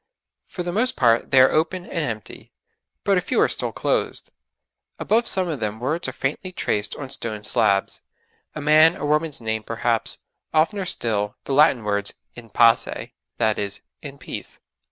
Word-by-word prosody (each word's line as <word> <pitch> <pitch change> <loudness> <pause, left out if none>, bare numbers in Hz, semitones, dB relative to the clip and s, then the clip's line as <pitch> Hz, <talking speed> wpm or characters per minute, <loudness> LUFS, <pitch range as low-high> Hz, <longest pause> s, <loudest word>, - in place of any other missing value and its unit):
For 180 - -5
the 175 - -3
most 235 +7 +1
part 115 -2 +3
they 135 - +5
are 130 - +6
open 170 +3 0
and 170 - -3
empty, 110 -7 -6 0.5
but 195 -2 +3
a - - -4
few - - -1
are - - +5
still - - -1
closed. - - -1 0.7
Above 230 +2 +1
some 185 -1 +2
of 155 -5 -3
them 110 0 -3
words 155 +8 -1
are - - -2
faintly 150 +7 -3
traced 105 - -1
on 135 -2 -7
stone 110 -5 -3
slabs; 100 -2 +1 0.5
a 150 - -5
man 155 +4 +5
or - - -4
woman's 150 -1 0
name 110 -1 -2
perhaps, 115 +1 -1 0.4
oftener 185 +5 +2
still 105 -8 -1
the 140 - -3
Latin 140 -5 +4
words, 100 -1 -2 0.2
'In 120 -2 -12
Pace' 115 +2 +2 0.3
that 110 -1 +1
is, 100 0 -4 0.2
'In 140 -2 -9
Peace.' - - -8
135 Hz, 175 wpm, -23 LUFS, 110-165 Hz, 0.7 s, are